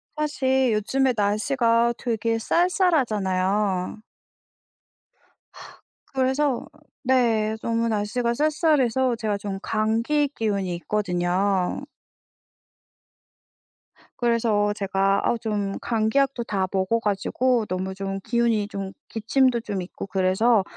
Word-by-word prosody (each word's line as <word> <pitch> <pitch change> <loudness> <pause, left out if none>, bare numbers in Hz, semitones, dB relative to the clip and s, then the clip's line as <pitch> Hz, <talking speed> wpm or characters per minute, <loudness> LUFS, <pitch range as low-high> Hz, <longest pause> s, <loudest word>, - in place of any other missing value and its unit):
사실 265 -5 +1
요즘에 260 +5 +1
날씨가 230 +3 +2
되게 230 -1 -1
쌀쌀하잖아요. 210 - +1 2.1
그래서 265 0 +1 0.4
네. 230 -4 +2
너무 230 0 0
날씨가 230 +3 0
쌀쌀해서 265 -4 +2
제가 215 -3 -2
좀 200 -1 -5
감기 230 +7 +1
기운이 200 -5 -1
있거든요. 185 +1 0 2.4
그래서 225 -3 +2
제가 195 -1 +1
아우 240 - +1
좀 205 -3 -2
감기약도 240 +3 0
다 195 -4 -1
먹어 195 +4 +1
가지고 225 +3 0
너무 185 +1 -3
좀 195 0 -4
기운이 235 -3 +1
좀 195 -2 -5 0.2
기침도 240 +2 +2
좀 200 -4 -4
있고 185 - -8
그래서 190 +3 +2
220 Hz, 215 characters per minute, -24 LUFS, 200-250 Hz, 2.4 s, 날씨가